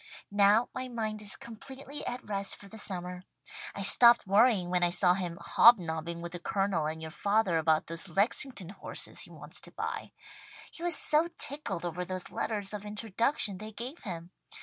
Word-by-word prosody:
Now 205 +3 +4
my 255 0 -4
mind 220 -3 -4
is 205 -2 -6
completely 265 +5 -9
at 245 +1 -5
rest 200 -1 0
for 200 - -13
the 220 +2 -10
summer. 180 -2 -4 0.5
I 200 - -4
stopped 235 +4 +7
worrying 200 -2 +3
when 180 -1 +1
I 175 - +3
saw 180 +1 +4
him 180 -2 -4
hobnobbing 170 -6 +4
with 170 - -6
the 175 - -6
Colonel 190 -3 0
and 160 +1 -5
your 160 - -6
father 200 -2 +1
about 155 0 +2
those 165 +3 -1
Lexington 200 +2 +1
horses 195 -1 -3
he - - -7
wants - - -6
to - - -6
buy. - - -5 0.6
He - - -11
was 345 -2 +1
so 310 +3 +4
tickled 285 - -2
over 175 +1 -3
those 185 0 -6
letters 205 -2 -2
of 210 -1 -5
introduction 210 0 -1
they 215 +1 -8
gave 250 +9 -7
him. 175 -3 -7
200 Hz, 180 wpm, -30 LUFS, 175-230 Hz, 0.6 s, stopped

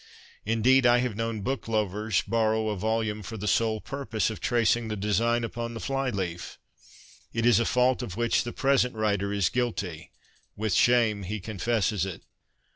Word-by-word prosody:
Indeed, 120 +3 +4
I 120 0 +5
have 120 -3 -1
known 115 -1 -3
book 130 +4 -3
lovers 105 -1 0
borrow 110 0 +1
a 105 - -1
volume 110 +1 -1
for 110 +3 -7
the 105 +1 -4
sole 110 +1 +1
purpose 110 -4 -2
of 110 - -7
tracing 120 -1 +1
the 110 - -3
design 115 +4 +1
upon 115 0 -4
the - - -5
fly 135 +1 -1
leaf. 90 -6 -4 0.8
It 115 0 0
is 120 -1 +5
a 120 - +1
fault 125 +1 +2
of 100 -6 -6
which 115 0 +1
the 120 - -5
present 135 -3 +1
writer 100 -2 0
is 100 -4 +1
guilty. 105 -8 -3 0.5
With 110 -1 -1
shame 115 -2 +3
he 105 +3 -4
confesses 105 -1 -1
it. 95 -4 -5
110 Hz, 175 wpm, -27 LUFS, 105-120 Hz, 0.8 s, I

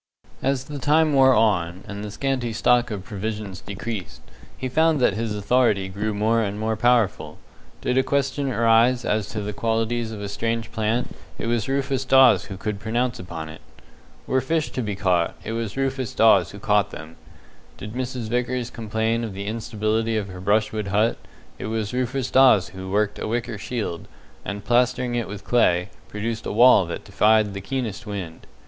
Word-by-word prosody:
As 135 -1 0
the 145 +1 -7
time 155 +3 +3
wore 130 -1 +6
on, 95 -5 +1
and 100 -1 -6
the 105 - -5
scanty 125 0 -2
stock 120 +2 +3
of 105 -4 -5
provisions 105 -2 -5
decreased, 100 - -6 0.4
he 130 - -3
found 160 +3 +2
that 125 - +3
his 110 0 -2
authority 105 -2 +2
grew 105 +3 -2
more 110 +3 +1
and 105 -1 -3
more 110 0 0
powerful. 120 -2 +1 0.4
Did 125 +1 +1
a - - +3
question 140 0 0
arise 115 +2 +3
as 105 -1 0
to 110 - -4
the 105 0 -4
qualities 115 +1 -1
of 110 - -7
a 100 - -4
strange 115 +2 -2
plant, 110 +2 -1 0.2
it - - -4
was 115 0 -1
Rufus 135 -1 0
Dawes 130 -1 +5
who 95 - -8
could 105 +1 -4
pronounce 120 +4 -1
upon 85 -3 -6
it. 80 +1 -11 0.6
Were 130 - +1
fish 155 +4 -1
to 130 - -3
be 105 -3 -3
caught, 90 -4 +1
it 110 - -5
was 115 0 -4
Rufus 135 -2 -2
Dawes 110 0 +5
who 100 - -10
caught 105 0 +2
them. 80 +1 -10 0.6
Did 105 +2 -8
Mrs. 125 -2 -4
Vickers 125 +1 -1
complain 110 +1 -1
of 110 -4 -4
the 100 +1 -5
instability 110 +1 -1
of 100 -2 -3
her 90 -1 -9
brushwood 105 +1 +1
hut, 105 +4 +1 0.4
it - - -4
was 110 -1 -3
Rufus 125 +1 -2
Dawes 130 -8 +5
who 95 0 -8
worked 105 +1 0
a - - -3
wicker 115 -1 -3
shield, 105 -7 -4 0.4
and 100 +2 -6
plastering 125 0 +2
it 120 -3 -1
with 100 0 -8
clay, 90 -6 +2 0.2
produced 110 +1 -4
a - - -2
wall 115 -4 +6
that 85 - -5
defied 105 +1 +3
the 100 - -5
keenest 115 -2 -4
wind. 95 -6 -6
110 Hz, 185 wpm, -23 LUFS, 100-125 Hz, 0.6 s, wore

